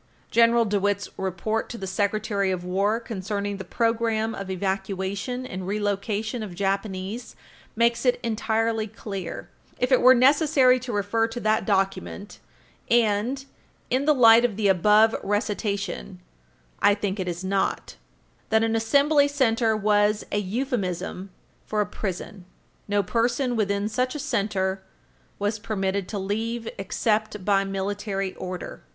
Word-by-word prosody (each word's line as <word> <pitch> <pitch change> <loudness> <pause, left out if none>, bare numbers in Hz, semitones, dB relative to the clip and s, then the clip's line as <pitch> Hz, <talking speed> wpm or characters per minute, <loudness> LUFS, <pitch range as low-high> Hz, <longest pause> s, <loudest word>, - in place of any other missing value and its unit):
General 230 0 +5
DeWitt's 205 -1 0
report 190 +4 -2
to 240 - -6
the 195 - -5
Secretary 200 0 0
of 185 -2 -2
War 200 +5 +1
concerning 205 -2 -4
the 190 - -6
programme 225 +1 0
of 195 -2 -6
evacuation 195 +5 -3
and 185 -5 -6
relocation 210 +2 -2
of 200 -5 -6
Japanese 195 +3 -3 0.4
makes 235 +1 +2
it 250 -2 +2
entirely 225 0 0
clear, 200 -4 -7 0.3
if 250 - 0
it 255 - +5
were 255 +1 +8
necessary 265 -1 +5
to 250 0 -6
refer 210 +2 +1
to 230 +1 -6
that 215 +1 +1
document 195 0 -1 0.5
and, 235 +4 +2 0.5
in 260 +2 +1
the 300 0 +4
light 230 -2 +7
of 240 -4 +1
the 215 -2 +2
above 210 +4 +5
recitation, 200 - -2 0.6
I 205 - +5
think 205 -1 -3
it 185 - -2
is 175 +1 -4
not, 195 +1 -1 0.5
that 220 0 +3
an 225 0 +1
Assembly 280 +6 +4
Center 230 -6 +2
was 210 0 +2
a 205 - +1
euphemism 200 -4 -3 0.4
for 215 - -1
a 210 - +3
prison. 195 -1 -6 0.4
No 205 0 +1
person 240 +5 0
within 200 -1 0
such 250 +5 -1
a - - -3
center 195 -5 -1 0.6
was 205 +1 -1
permitted 195 -3 -2
to 210 - -4
leave 225 +4 -3
except 210 0 -1
by 195 -1 +3
Military 195 0 -3
Order. 185 -1 -6
210 Hz, 140 wpm, -25 LUFS, 195-230 Hz, 0.6 s, were